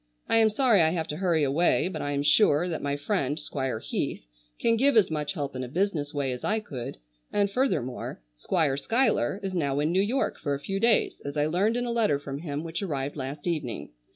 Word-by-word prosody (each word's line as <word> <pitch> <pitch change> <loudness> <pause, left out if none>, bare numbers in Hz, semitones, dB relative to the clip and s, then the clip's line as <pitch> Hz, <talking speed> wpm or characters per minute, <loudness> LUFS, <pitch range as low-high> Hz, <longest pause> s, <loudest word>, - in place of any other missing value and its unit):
I - - +3
am 220 -1 +5
sorry 220 -3 +4
I 160 - +4
have 165 -1 -1
to 150 - -3
hurry 170 -5 +2
away, 150 +6 +2
but 185 - -4
I 145 - -2
am 140 0 0
sure 150 +1 +4
that 165 -3 -3
my 140 0 -1
friend 145 -2 -1
Squire 135 -5 -3
Heath - - -3 0.3
can 230 - +3
give 270 +2 +3
as 200 -6 +4
much 150 0 -2
help 145 -6 -4
in 130 - -3
a - - -4
business 155 -1 -1
way 140 -4 -1
as 125 - -5
I 220 +1 +1
could, 135 - -7 0.3
and 200 -1 +1
furthermore, 165 - -1 0.2
Squire 140 - 0
Schuyler 225 - +1
is 190 -1 -3
now 145 -5 0
in 150 +2 +1
New 185 +2 +3
York 235 +7 0
for 145 -2 -1
a - - -6
few 195 +7 -3
days 230 +1 +2
as 140 +1 -5
I 145 - +3
learned 195 +9 +1
in 245 - -1
a 240 - -2
letter 225 -11 +2
from 140 -1 -6
him 150 -2 -4
which 165 +2 -4
arrived 145 -7 -3
last 140 +1 -5
evening. 135 - -3
155 Hz, 230 wpm, -27 LUFS, 140-200 Hz, 0.3 s, am